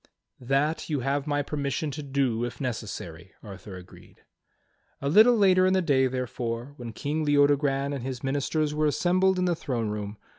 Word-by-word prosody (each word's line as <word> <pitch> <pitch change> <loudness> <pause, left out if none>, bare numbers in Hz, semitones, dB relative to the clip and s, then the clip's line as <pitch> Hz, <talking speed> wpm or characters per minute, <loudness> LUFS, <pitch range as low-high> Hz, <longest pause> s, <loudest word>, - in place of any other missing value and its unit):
"That 140 +7 0
you 145 -4 -1
have 140 +3 -1
my 145 0 0
permission 145 +1 -3
to 150 +2 -6
do, 135 -5 -1
if 120 - -5
necessary," 100 - -6
Arthur 100 -2 -10
agreed. 90 -1 -15 0.8
A 140 - -3
little 220 +10 +6
later 185 -2 +5
in 185 - +2
the 190 - +3
day, 135 -5 +3
therefore, 125 0 -4
when 120 -2 -7
King 150 +7 -3
Leodogran 145 -1 +2
and 140 - -4
his 130 -2 -5
ministers 145 +3 -1
were 155 0 +1
assembled 185 +5 +2
in 180 - +1
the 175 - +2
throne 120 -8 -3
room. 105 0 -5
140 Hz, 175 wpm, -26 LUFS, 120-150 Hz, 0.8 s, little